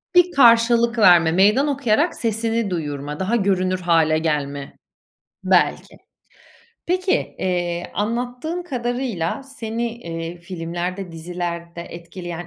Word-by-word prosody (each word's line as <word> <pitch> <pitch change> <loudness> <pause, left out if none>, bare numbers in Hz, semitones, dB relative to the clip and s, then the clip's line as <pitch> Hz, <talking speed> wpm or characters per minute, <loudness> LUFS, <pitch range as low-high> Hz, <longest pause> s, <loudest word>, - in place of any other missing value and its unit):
Bir 355 0 +6
karşılık 235 -3 +5
verme, 175 -5 +6
meydan 210 - +4
okuyarak 280 +2 +1
sesini 225 -1 -1
duyurma, 150 -3 -4
daha 190 +5 0
görünür 185 -3 +1
hâle 165 -3 +3
gelme, 145 -3 -3 0.7
belki. - - +1 0.9
Peki, 370 +2 +1 0.3
eee, 175 -1 -2
anlattığın 245 - -2
kadarıyla 245 - -3
seni, 235 -3 -4
eee, 165 -3 -6
filmlerde 175 +1 -5
dizilerde 170 0 -5
etkileyen 175 0 -8
185 Hz, 100 wpm, -21 LUFS, 170-235 Hz, 0.9 s, Bir